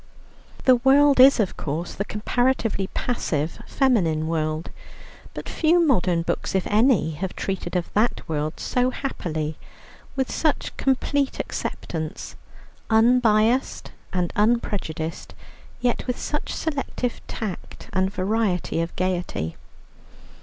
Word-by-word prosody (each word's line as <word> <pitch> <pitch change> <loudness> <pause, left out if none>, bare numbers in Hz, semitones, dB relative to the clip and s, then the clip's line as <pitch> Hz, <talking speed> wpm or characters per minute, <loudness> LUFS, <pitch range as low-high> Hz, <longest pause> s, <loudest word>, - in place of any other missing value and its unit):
The 255 -1 +7
world 275 +2 +5
is, 265 0 +8
of 205 -4 0
course, 160 +4 -3
the 200 - -3
comparatively 225 -2 0
passive 165 - -1
feminine 170 - +2
world, 155 0 -2 0.6
but - - -6
few 335 +2 +3
modern 180 - +2
books 180 - -2
(if 190 - +1
any) 215 - +3
have 180 +4 -5
treated 190 -2 -3
of 175 -1 -2
that 220 +4 +1
world 155 0 -2
so 250 0 +1
happily, 160 - -4 0.6
with 265 -1 -1
such 310 -2 0
complete 270 +1 0
acceptance, 160 -2 -4 0.5
unbiassed 230 +1 +3 0.2
and 180 -2 -1
unprejudiced, 205 -8 -1 0.5
yet 245 +1 0
with 250 - -1
such 295 - -3
selective 275 -5 -3
tact 210 -5 -6
and 190 0 +1
variety 190 -4 0
of 165 - -4
gaiety. 175 - -2
210 Hz, 115 wpm, -24 LUFS, 165-250 Hz, 0.6 s, is